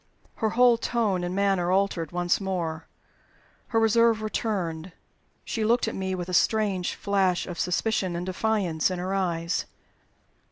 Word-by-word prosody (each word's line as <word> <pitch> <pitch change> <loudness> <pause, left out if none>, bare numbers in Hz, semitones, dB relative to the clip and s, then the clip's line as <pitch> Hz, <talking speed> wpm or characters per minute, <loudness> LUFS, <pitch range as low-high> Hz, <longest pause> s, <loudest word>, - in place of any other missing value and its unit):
Her 220 - +1
whole 245 -2 +6
tone 215 -8 0
and 175 +1 -3
manner 195 -3 +1
altered 190 -4 0
once 175 +2 0
more. 170 -4 -3 0.8
Her 225 - +1
reserve 225 0 +3
returned; 185 -6 -3 0.5
she 225 - -2
looked 230 +2 +2
at 225 - -2
me 190 -1 -2
with 175 -1 -5
a 180 - -5
strange 200 -2 +1
flash 195 -3 +1
of 175 -2 -7
suspicion 185 0 0
and 175 +1 -3
defiance 185 -4 0
in 185 - -3
her 185 +2 -3
eyes. 170 -3 -1
190 Hz, 150 wpm, -26 LUFS, 175-215 Hz, 0.8 s, whole